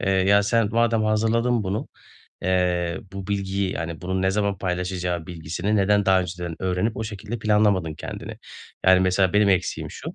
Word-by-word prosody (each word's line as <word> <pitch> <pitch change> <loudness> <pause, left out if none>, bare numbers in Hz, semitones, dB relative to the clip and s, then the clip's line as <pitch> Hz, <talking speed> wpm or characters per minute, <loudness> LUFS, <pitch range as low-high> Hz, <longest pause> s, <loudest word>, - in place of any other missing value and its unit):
"Eee, 100 - 0
ya 95 +2 +4
sen, 105 +1 +2
madem 115 -1 +2
hazırladın 115 +2 +1
bunu, 95 +3 -3 0.5
eee, 90 -2 0
bu 95 -1 -6
bilgiyi, 100 -1 -1
yani, 80 0 -5
bunun 95 0 -2
ne 95 - +2
zaman 100 -1 0
paylaşacağı 90 -2 -2
bilgisini 85 +5 -2
neden 100 0 +2
daha 95 -1 +5
önceden 90 -2 -5
öğrenip 95 +4 0
o 110 - -3
şekilde 110 +2 -6
planlamadın 105 -6 +2
kendini?" - - -7 0.5
Yani, 95 0 +7
mesela 95 0 +2
benim 105 0 +4
eksiğim 95 -2 0
şu; - - -8
95 Hz, 165 wpm, -24 LUFS, 90-105 Hz, 0.5 s, Yani